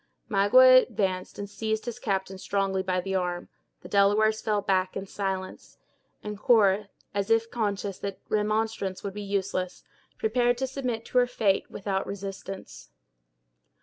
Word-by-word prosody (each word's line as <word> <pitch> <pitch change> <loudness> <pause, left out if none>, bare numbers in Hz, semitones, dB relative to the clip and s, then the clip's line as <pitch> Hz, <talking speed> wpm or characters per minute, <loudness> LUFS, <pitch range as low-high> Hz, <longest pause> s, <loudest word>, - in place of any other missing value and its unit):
Magua 255 +5 +7
advanced, 190 -6 -2
and 205 - -5
seized 220 +1 -3
his 240 0 -5
captive 190 -5 -2
strongly 195 -1 0
by 185 -1 0
the 190 +2 -3
arm; 180 -2 -2 0.3
the - - -10
Delawares 210 +2 +3
fell 210 -2 +1
back, 190 -2 0
in 195 - -4
silence; 190 -1 -5 0.5
and 210 -1 -6
Cora, 205 -3 +4 0.2
as 200 -1 -1
if 225 0 +2
conscious 205 -4 -2
that 200 -1 -4
remonstrance 215 -2 -1
would 200 - -4
be 210 - -6
useless, 195 -2 -2 0.3
prepared 240 +2 +2
to 265 - -1
submit 250 -4 -3
to 250 - +2
her 245 - +3
fate 210 -5 +1
without 195 -1 -3
resistance. 195 -1 -7
200 Hz, 150 wpm, -27 LUFS, 195-220 Hz, 0.5 s, Magua